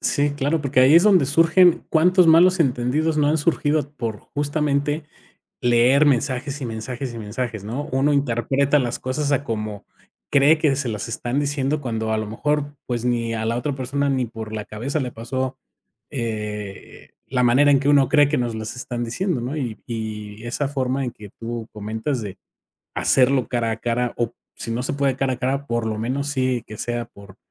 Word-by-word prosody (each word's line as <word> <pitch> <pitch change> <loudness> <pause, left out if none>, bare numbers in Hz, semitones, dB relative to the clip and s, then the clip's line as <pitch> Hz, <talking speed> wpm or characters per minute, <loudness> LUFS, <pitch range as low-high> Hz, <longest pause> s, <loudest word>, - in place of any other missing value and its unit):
Sí, 145 0 +1
claro, 145 +3 0
porque 135 -2 +2
ahí 135 +5 +6
es 170 - +8
donde 190 -8 +5
surgen, 165 +4 +4
cuántos 180 +3 +4
malos 175 +3 +6
entendidos 140 +4 +1
no 145 -1 +3
han 155 - +2
surgido 150 -2 +1
por 110 -3 -3
justamente 145 +1 -1 0.6
leer 120 +4 +4
mensajes, 135 +1 0
y 125 - -3
mensajes, 120 +3 -5
y 115 - -6
mensajes, 110 0 -4
¿no? 125 +8 -4
Uno 135 +3 +2
interpreta 140 +2 +2
las 120 -3 -1
cosas 140 +3 -2
a 140 +1 +1
como 105 -3 -4 0.4
cree 145 +3 +5
que 150 -4 +2
se 135 -2 -2
las 110 +1 -4
están 120 +4 -2
diciendo 145 +1 -1
cuando 110 -4 -2
a 110 - +1
lo 110 - -3
mejor, 145 +6 -2
pues, 120 -1 -2
ni 115 -2 0
a 110 0 -2
la 115 +1 0
otra 140 +3 -2
persona, 140 +2 -1
ni 130 -2 0
por 110 -1 -8
la 105 - -4
cabeza 130 +8 -3
le 125 -2 -3
pasó, 130 +3 -3 0.5
eh, 105 -4 -5 0.2
la 125 -2 0
manera 130 +4 +5
en 135 -1 +5
que 140 - 0
uno 140 -3 +5
cree 145 -2 +5
que 150 - 0
nos 120 -2 -1 0.2
están 120 -1 -4
diciendo, 170 - -1
¿no? 130 +6 -4
Y 120 -7 -3
y 110 -2 -6
esa 135 +4 -2
forma 135 -1 -1
en 120 - -4
que 105 -4 -12
tú 115 -1 -5
comentas 110 +5 -3
de 100 -1 -7 0.6
hacerlo 130 -2 +3
cara 120 -2 0
a 110 - -2
cara, 120 +1 -1
o 120 0 -1 0.2
si 115 - -6
no 120 +2 -1
se - - -2
puede 140 -2 0
cara 135 -1 0
a - - -8
cara, 135 +2 -1
por 120 -1 -1
lo 110 -1 -2
menos 135 +5 -2
sí 130 -4 0
que 110 - -9
sea 120 -1 -3
por 100 -4 -15
130 Hz, 195 wpm, -22 LUFS, 115-145 Hz, 0.6 s, es